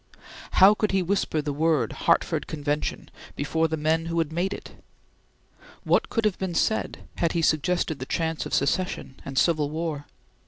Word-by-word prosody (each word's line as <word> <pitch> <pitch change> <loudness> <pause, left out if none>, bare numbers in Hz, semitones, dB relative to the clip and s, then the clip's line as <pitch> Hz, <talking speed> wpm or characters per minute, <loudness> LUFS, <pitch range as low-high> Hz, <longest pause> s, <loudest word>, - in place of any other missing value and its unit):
How 195 +2 +8
could 210 -1 -1
he 190 -1 +2
whisper 175 -4 0
the 145 -1 -2
word 150 -5 +1
Hartford - - +1
Convention 150 -1 -3 0.2
before 160 +3 0
the 160 0 -2
men 160 +2 0
who 170 0 -2
had 160 -2 0
made 175 +4 -1
it? - - -7 1.1
What - - +2
would 225 -2 +2
have 210 -3 +1
been 185 -3 -3
said 220 - 0
had 170 -2 +1
he 170 -2 0
suggested 160 0 +1
the 130 - -6
chance 160 -1 -1
of - - -9
Secession 140 -2 -1
and 135 -1 -7
Civil 150 -2 +2
War? 155 -2 -4
160 Hz, 170 wpm, -25 LUFS, 150-180 Hz, 1.1 s, How